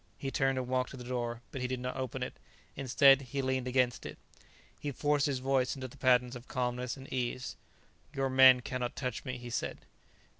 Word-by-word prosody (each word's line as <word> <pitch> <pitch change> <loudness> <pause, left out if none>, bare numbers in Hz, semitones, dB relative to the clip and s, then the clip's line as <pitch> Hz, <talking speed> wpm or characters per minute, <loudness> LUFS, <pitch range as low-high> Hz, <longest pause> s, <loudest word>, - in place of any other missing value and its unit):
He 135 - -4
turned 135 -1 +1
and 130 -1 -2
walked 130 0 0
to 140 - -9
the 125 - -8
door, 120 -1 -3
but 130 - -5
he 125 - 0
did 130 0 -3
not 125 0 -4
open 130 0 -3
it. 125 - -5 0.4
Instead, 135 +1 +5
he 135 +1 -4
leaned 130 -1 -1
against 125 -2 +1
it. - - -7 0.6
He 145 - -3
forced 145 +2 +1
his 140 -2 0
voice 130 0 +1
into 130 -1 -5
the 130 - -15
patterns 125 -2 +3
of 125 +1 -10
calmness 125 0 -2
and 135 0 -10
ease. 125 0 -2 0.6
"Your 135 -2 -1
men 130 -1 +8
cannot 125 -1 -3
touch 125 -4 -3
me," 125 -1 -4
he 120 0 -8
said. - - -3
130 Hz, 210 wpm, -32 LUFS, 125-135 Hz, 0.6 s, men